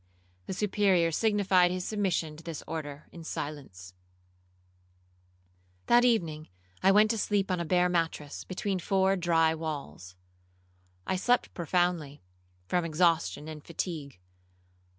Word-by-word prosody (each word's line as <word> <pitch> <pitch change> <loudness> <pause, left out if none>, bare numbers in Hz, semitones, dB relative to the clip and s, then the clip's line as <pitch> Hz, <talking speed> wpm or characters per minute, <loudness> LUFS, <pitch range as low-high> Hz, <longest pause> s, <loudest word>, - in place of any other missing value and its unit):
The - - -3
Superior 190 -4 +2
signified 195 -2 +3
his 180 0 -3
submission 185 -7 -1
to 160 - -13
this 165 -3 -6
order 150 -3 -6
in 170 - -10
silence. 135 - -7 1.9
'That 240 +1 +5
evening 165 -11 +1 0.3
I 190 - +5
went 210 +2 +5
to 225 - -2
sleep 200 -2 0
on 180 - 0
a 170 - -2
bare 180 +2 +3
mattress, 165 -4 -2
between 190 +1 -3
four 190 +1 +2
dry 165 -3 +2
walls. 140 - -6 0.9
I 190 - -1
slept 245 +6 +1
profoundly, 170 - -1 0.4
from 175 - 0
exhaustion 165 -1 +1
and 155 -2 -8
fatigue. 160 - -5
170 Hz, 125 wpm, -29 LUFS, 155-190 Hz, 1.9 s, That